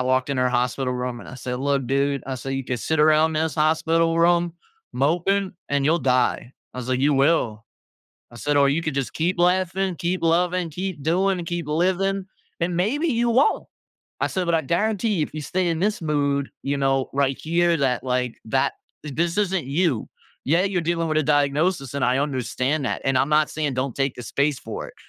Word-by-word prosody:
walked 130 +1 +1
in 135 - -1
her 125 - +3
hospital 125 +1 0
room, 125 -1 -4
and - - -11
I - - -9
said, 125 0 -4
"Look, 140 -2 0
dude." 140 +1 0
I 135 -1 -3
said, 135 +2 -6
"You 135 -1 -3
could 125 -2 -3
sit 160 +6 -1
around 155 +1 +4
in 155 - +2
this 160 -4 -2
hospital 165 +2 +2
room 170 0 +3 0.4
moping, 175 +8 +1 0.2
and 140 -1 +1
you'll 160 +4 +3
die." 125 -1 +1 0.2
I - - -7
was 125 0 -5
like, 130 0 0
"You 145 +2 +3
will." 135 -6 +1 0.7
I - - -11
said, 145 +5 -1
"Or 140 -1 +5
you 150 +4 +1
could 155 -4 -3
just 130 -4 -2
keep 175 +2 0
laughing, 185 +1 +1
keep 175 +3 -2
loving, 175 +1 +1
keep 180 -2 -5
doing, 185 +4 +1
and 170 - -6
keep 175 -3 -3
living, 190 +4 0 0.3
and 170 0 0
maybe 245 - 0
you 235 -2 +1
won't." 260 +5 +2 0.5
I - - +2
said, 185 -2 -2
"But 170 - +1
I 160 - 0
guarantee 210 - 0
you, - - +3
if - - -11
you 155 - -4
stay 180 +4 -1
in 165 -1 -1
this 205 -2 0
mood, 140 -2 0
you 140 +1 -1
know, 135 -1 +1
right 135 -1 +1
here, 170 +1 +2
that, 130 -3 0
like, 125 -2 -1
that 130 +4 +1 0.3
this 165 +6 -1
isn't 190 -5 0
you. 145 -4 0 0.4
Yeah, 170 +6 +3
you're 190 -3 0
dealing 165 0 0
with 155 - +1
a 155 - +2
diagnosis, 145 0 +1
and 140 - 0
I 125 +1 +2
understand 140 +1 -1
that, - - -2
and 135 -1 +1
I'm 135 - +2
not 150 0 +4
saying 150 -3 -2
don't 130 -1 -2
take 135 -1 0
the 125 - -7
space 140 +4 0
for 110 - -6
it. - - -16
150 Hz, 215 wpm, -23 LUFS, 135-175 Hz, 0.7 s, Or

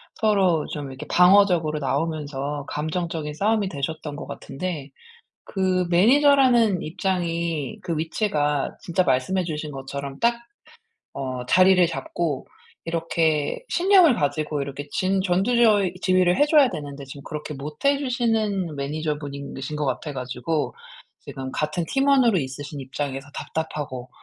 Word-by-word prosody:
서로 190 -7 +2
좀 145 -2 -5
이렇게 135 +3 -8
방어적으로 180 -4 +4
나오면서 145 -1 -2
감정적인 155 0 -3
싸움이 205 +2 +1
되셨던 150 0 -4
것 - - -7
같은데 150 -2 -5 0.6
그 185 -2 0
매니저라는 240 0 +5
입장이 170 -4 -2
그 170 - -2
위치가 150 -3 -1
진짜 180 +1 0
말씀해 170 +9 +1
주신 155 -2 -4
것처럼 140 0 -6
딱 235 +1 +4 0.8
어 130 -2 -4
자리를 185 +5 +5
잡고 165 -3 -3 0.4
이렇게 165 - 0
신념을 365 -5 +5
가지고 150 -3 -1
이렇게 140 +1 -6
진 190 +1 +1
전두 195 +6 +1
저위 210 -6 +4
지휘를 185 -1 +3
해 290 - +4
줘야 295 -4 +5
되는데 145 -4 -7
지금 140 +1 -10
그렇게 150 0 -6
못해 150 - -1
주시는 220 - 0
매니저분이신 145 -1 -4
것 150 - -2
같아 145 +3 -3
가지고 130 +4 -2 0.5
지금 130 -1 -7
같은 155 +5 -2
팀원으로 270 -6 +4
있으신 145 +1 -5
입장에서 135 +1 -4
답답하고 145 -5 -4
160 Hz, 310 characters per minute, -24 LUFS, 145-190 Hz, 0.8 s, 매니저라는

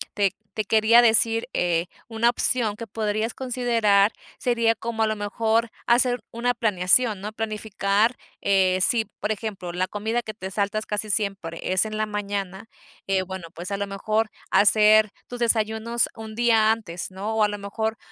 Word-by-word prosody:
te 200 -2 +1 0.2
te 215 - -1
quería 220 +2 +5
decir, 225 +1 +3
eh, 175 0 0 0.2
una 230 0 +2
opción 235 -3 +1
que 230 - -7
podrías 215 +2 -2
considerar 230 -5 +2 0.2
sería 235 -2 +1
como 225 0 -3
a - - +2
lo 215 0 -2
mejor 225 +2 0 0.2
hacer 245 -1 +3
una 245 +1 0
planeación, 210 0 +2
¿no? 210 +2 -6
Planificar, 215 +1 0 0.2
eh, 190 -2 +2
sí, 225 +3 +3 0.2
por 215 - -1
ejemplo, 200 -5 -6
la 185 +1 -1
comida 220 +3 -2
que 215 - -7
te 190 -3 -7
saltas 205 +2 -1
casi 210 0 -2
siempre 195 -6 -1
es 185 - +4
en 215 -1 -4
la 215 - 0
mañana, 200 -1 -5 0.4
eh, 190 -1 0
bueno, 185 -3 -8
pues, 175 +3 -6
a - - 0
lo 200 0 -2
mejor, 215 +2 -1 0.2
hacer 215 +1 +5 0.2
tus 245 - -8
desayunos 225 0 +1
un 220 -1 -9
día 225 -2 +3
antes, 190 -6 -4
¿no? 200 +4 -4
O 220 - +3
a 210 - +3
lo 205 - -4
mejor, 220 +2 -3
215 Hz, 170 wpm, -24 LUFS, 200-225 Hz, 0.4 s, quería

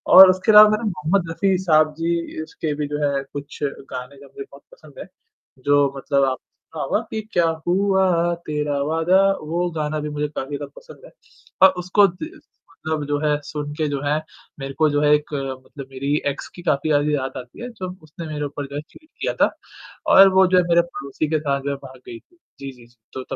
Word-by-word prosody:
और 190 0 +12
उसके 185 +3 +2
अलावा 210 0 +9
मैंने 215 0 0
मोहम्मद 165 +2 -1
रफ़ी 190 +2 +1
साहब 155 -3 +3
जी 170 +1 0 0.5
के 155 -2 0
भी 150 0 -3
जो 150 +1 -4
है 140 -1 -1
कुछ 145 0 -8
गाने 135 -1 -6
जो 140 - -14
है - - -19
मुझे 410 -1 -8
बहुत - - -15
पसंद - - -16
है। - - -7 0.6
जो 145 -1 +3
मतलब 140 0 +1
आपने 130 -1 -3 0.3
सुना - - -3
होगा - - 0
कि 220 - -3
क्या 175 -1 +3 0.2
हुआ 185 -2 +2
तेरा 150 -1 -2
वादा 165 +5 +2 0.2
वो 170 +3 -2
गाना 150 0 -2
भी 150 - -4
मुझे 150 0 -2
काफ़ी 140 +2 -4
ज़्यादा - - -8
पसंद - - -15
है। - - -15 0.6
और - - +1
उसको 200 +3 +4
दि 195 - -7 0.5
मतलब 155 -2 -2
जो 145 0 0
है 150 -1 +2
सुन 145 -1 -5
के 155 0 -1
जो 140 -1 -3
है 150 +1 +1 0.4
मेरे 135 0 -6
को 155 -1 +4
जो 145 0 0
है 150 0 +3
एक 150 0 -5
मतलब 135 0 -6
मेरी 135 +2 -2 0.2
एक्स 140 - -8
की 175 - -10
काफ़ी 155 -2 0
ज़्यादा 145 0 +2
याद 135 -3 -2
आती 125 - -15
है 245 - -5
जो 185 -5 -6
उसने 155 +2 -9
मेरे 150 -1 -4
ऊपर 145 0 -5
जो 140 - -9
है 145 - -3
चीट 310 - -19
किया - - -1
था - - +4 0.6
और 195 0 +10
वो 190 0 +5
जो 185 0 +3
है 180 - +5
मेरे 170 0 +5
पड़ोसी 150 -3 -5
के 155 0 +1
साथ 140 -2 -1
जो 140 - -3
है - - -2
भाग 130 0 -12
गई 115 - -8
थी। 350 - -31 0.2
जी, 140 0 -6
जी, 125 -2 -17
जी, 120 +1 -25 0.2
तो 130 - -5
तब - - -6
150 Hz, 230 wpm, -21 LUFS, 140-180 Hz, 0.6 s, और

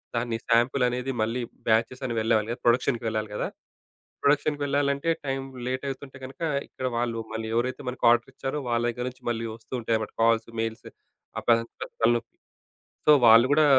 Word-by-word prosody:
దాన్ని 115 -1 -1
సాంపిల్ 120 +3 +3
అనేది 125 +2 -2
మళ్ళీ 115 +3 0 0.3
బ్యాచెస్ 115 +4 +1
అని 120 - -2
వెళ్ళే 110 +1 +1
ప్రొడక్షన్‌కి 120 0 +2
వెళ్ళాలి 110 -1 -2
గదా! - - -1 0.8
ప్రొడక్షన్‌కి 145 +1 +2
వెళ్ళాలంటే 140 +2 +1 0.2
టైమ్ 135 0 -2 0.2
లేట్ 130 +2 -2
అవుతుంటే 135 0 -7
గనక 135 +1 -10 0.3
ఇక్కడ 130 - -5
వాళ్ళు 115 -1 -1
మళ్ళీ 110 0 -3
ఎవరైతే 125 +2 -1
మనకు 125 - -5
ఆర్డర్ 120 +2 +2
ఇచ్చారో 135 +3 -4
వాళ్ళ 120 0 +1
దగ్గర 125 +1 -3
నుంచి 125 - -21
మళ్ళీ 115 -1 -1
ఒస్తూ 115 +2 -26
ఉంటాయి 115 0 0
అన్నమాట 110 -1 -4
కాల్స్, 115 0 +3
మెయిల్స్ 115 0 -4 0.5
అప్పుడు 120 - +3
అదంతా 115 0 -6 0.2
తలనొప్పి. 120 0 +1 0.7
సో, 150 - +7
వాళ్ళు 115 +2 +8
గూడా 155 +1 +5
120 Hz, 165 wpm, -26 LUFS, 115-135 Hz, 0.8 s, వాళ్ళు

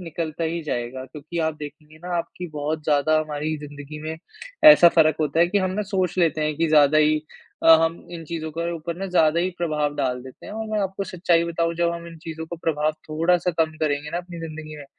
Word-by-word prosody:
निकलता 165 -1 -4
ही 165 +1 -2
जाएगा 125 -1 -4
क्योंकि 150 +6 -8
आप 160 - -2
देखेंगे 150 +1 -10
ना 180 - -2
आपकी 170 +1 -5
बहुत 150 +1 -3
ज़्यादा 155 +1 +3
हमारी 155 0 -3
ज़िंदगी 145 0 -9
में 160 +1 -4 0.5
ऐसा 300 - +10
फ़र्क 155 -1 +5
होता 155 +2 +1
है 175 - +6
कि 200 +2 +2
हम 185 -1 0
ना 210 +3 -2
सोच 185 -3 0
लेते 160 -3 +2
हैं 150 0 0
कि 165 0 +1
ज़्यादा 150 0 +5
ही 155 0 +4 0.5
अ, 165 - +10
हम 165 +1 -2
इन 165 -1 -7
चीज़ों 160 0 -5
के 170 +1 -2
ऊपर 165 +1 -5
ना 195 - -3
ज़्यादा 170 -2 +3
ही 185 - 0
प्रभाव 150 -3 -1
डाल 125 -3 -1
देते 130 -1 -12
हैं - - -8
और 220 0 -4
मैं 215 -1 0
आपको 195 0 -2
सच्चाई 170 -2 +1
बताऊँ, 170 0 -1
जब 170 0 +1
हम 170 0 -7
इन 165 -1 -11
चीज़ों 160 0 -7
को 170 - -6
प्रभाव 155 -2 0 0.2
थोड़ा-सा 170 +3 +2
कम 160 0 -3
करेंगे 145 0 -1
ना 170 - -2
अपनी 175 -1 -8
जिंदगी 155 -1 -7
में, 145 - -9
160 Hz, 230 wpm, -23 LUFS, 150-170 Hz, 0.5 s, ऐसा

